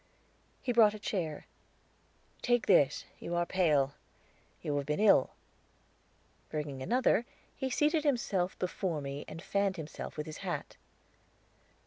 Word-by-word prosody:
He 245 Hz, -, 0 dB
brought 215 Hz, -3 st, +6 dB
a -, -, -5 dB
chair. 170 Hz, -7 st, -3 dB, 1.0 s
"Take 240 Hz, -2 st, +2 dB
this; 145 Hz, -8 st, +4 dB
you 175 Hz, -, -4 dB
are 175 Hz, 0 st, +2 dB
pale. 150 Hz, -7 st, +2 dB, 0.7 s
You 145 Hz, -, -1 dB
have 140 Hz, -1 st, -2 dB
been 150 Hz, +3 st, 0 dB
ill." 205 Hz, -11 st, +5 dB, 1.2 s
Bringing 145 Hz, -3 st, -4 dB
another, 240 Hz, -, +2 dB, 0.3 s
he 265 Hz, -, -2 dB
seated 300 Hz, +4 st, +2 dB
himself 210 Hz, -, 0 dB
before 180 Hz, -3 st, -2 dB
me 140 Hz, 0 st, -5 dB
and 165 Hz, +2 st, -8 dB
fanned 200 Hz, -1 st, 0 dB
himself 155 Hz, -1 st, -7 dB
with 150 Hz, -, -3 dB
his 155 Hz, -, -7 dB
hat. -, -, -4 dB
175 Hz, 130 wpm, -32 LUFS, 150-215 Hz, 1.2 s, brought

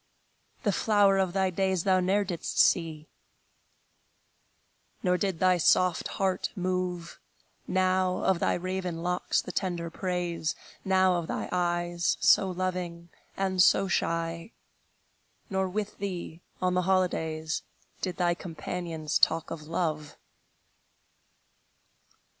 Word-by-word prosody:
The -, -, +2 dB
flower 205 Hz, -3 st, +3 dB
of 190 Hz, -2 st, +1 dB
thy 190 Hz, -1 st, +1 dB
days 190 Hz, -1 st, 0 dB
thou 190 Hz, -1 st, +3 dB
ne'er 195 Hz, +3 st, +2 dB
didst 180 Hz, -4 st, -4 dB
see; 160 Hz, -3 st, +2 dB, 2.0 s
Nor 180 Hz, -2 st, +3 dB
did 190 Hz, -1 st, -1 dB
thy 185 Hz, -1 st, +4 dB
soft 180 Hz, +1 st, +3 dB
heart 190 Hz, -2 st, 0 dB
move 180 Hz, -2 st, -3 dB, 0.5 s
Now 185 Hz, 0 st, +1 dB
of 190 Hz, -3 st, +2 dB
thy -, -, +1 dB
raven 180 Hz, -2 st, -3 dB
locks 180 Hz, 0 st, 0 dB
the -, -, -6 dB
tender 170 Hz, -2 st, -2 dB
praise, 175 Hz, -3 st, -2 dB, 0.3 s
Now 190 Hz, -1 st, +3 dB
of 170 Hz, -2 st, -3 dB
thy -, -, -3 dB
eyes, 175 Hz, -1 st, 0 dB
so 190 Hz, -, +5 dB
loving 180 Hz, -2 st, -3 dB, 0.3 s
and 190 Hz, -1 st, +1 dB
so 195 Hz, +1 st, +5 dB
shy; 165 Hz, +2 st, -1 dB, 1.0 s
Nor 190 Hz, -1 st, 0 dB
with 210 Hz, +2 st, -4 dB
thee, 180 Hz, -4 st, -5 dB, 0.2 s
on 180 Hz, 0 st, +2 dB
the 180 Hz, -, +2 dB
holidays, 160 Hz, -4 st, 0 dB, 0.4 s
Did 180 Hz, -2 st, -3 dB
thy 175 Hz, -1 st, +2 dB
companions 165 Hz, -2 st, -3 dB
talk 165 Hz, -, +2 dB
of 155 Hz, -2 st, -7 dB
love. 155 Hz, -3 st, -2 dB
180 Hz, 120 wpm, -28 LUFS, 170-185 Hz, 2.0 s, so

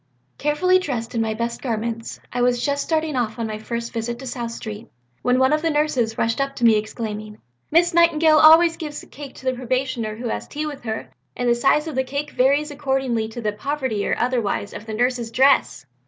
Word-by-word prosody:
"Carefully 365 Hz, +6 st, +3 dB
dressed 245 Hz, -9 st, -4 dB
in 230 Hz, -, 0 dB
my 220 Hz, -1 st, -1 dB
best 235 Hz, +1 st, -3 dB
garments 230 Hz, -2 st, -3 dB
I 245 Hz, -, -1 dB
was 245 Hz, 0 st, +2 dB
just 285 Hz, -1 st, 0 dB
starting 315 Hz, -2 st, -1 dB
on 230 Hz, -2 st, -1 dB
my 215 Hz, -1 st, -4 dB
first 235 Hz, +1 st, -5 dB
visit 235 Hz, +1 st, -3 dB
to 265 Hz, -, -9 dB
South 240 Hz, -2 st, -4 dB
Street 220 Hz, 0 st, -7 dB, 0.3 s
when 250 Hz, +1 st, +2 dB
one 260 Hz, +2 st, +3 dB
of 305 Hz, -, +1 dB
the 330 Hz, -, +1 dB
nurses 280 Hz, -7 st, 0 dB
rushed 230 Hz, +4 st, 0 dB
up 275 Hz, 0 st, -2 dB
to -, -, -5 dB
me 225 Hz, -1 st, +6 dB
exclaiming, 215 Hz, 0 st, -4 dB, 0.3 s
'Miss 345 Hz, +2 st, +3 dB
Nightingale 325 Hz, -2 st, +5 dB
always 330 Hz, +2 st, +7 dB
gives 300 Hz, -2 st, -6 dB
a -, -, -13 dB
cake 280 Hz, -2 st, -10 dB
to -, -, -13 dB
the 260 Hz, -, +2 dB
probationer 255 Hz, -3 st, -2 dB
who 235 Hz, +1 st, -4 dB
has -, -, -4 dB
tea 300 Hz, +1 st, -4 dB
with 295 Hz, -2 st, -6 dB
her, 220 Hz, 0 st, -4 dB, 0.3 s
and 245 Hz, -, -1 dB
the 240 Hz, -, +5 dB
size 280 Hz, +5 st, +2 dB
of 315 Hz, -, -4 dB
the 260 Hz, 0 st, +1 dB
cake 280 Hz, +3 st, -4 dB
varies 285 Hz, +4 st, +2 dB
according 265 Hz, -6 st, -1 dB
to 235 Hz, +2 st, -7 dB
the 215 Hz, -2 st, 0 dB
poverty 260 Hz, -2 st, -2 dB
or -, -, 0 dB
otherwise 235 Hz, -5 st, -1 dB
of 215 Hz, -, -9 dB
the 220 Hz, -, -5 dB
nurse's 245 Hz, 0 st, 0 dB
dress.' 265 Hz, -, +3 dB
250 Hz, 215 wpm, -22 LUFS, 230-290 Hz, 0.3 s, always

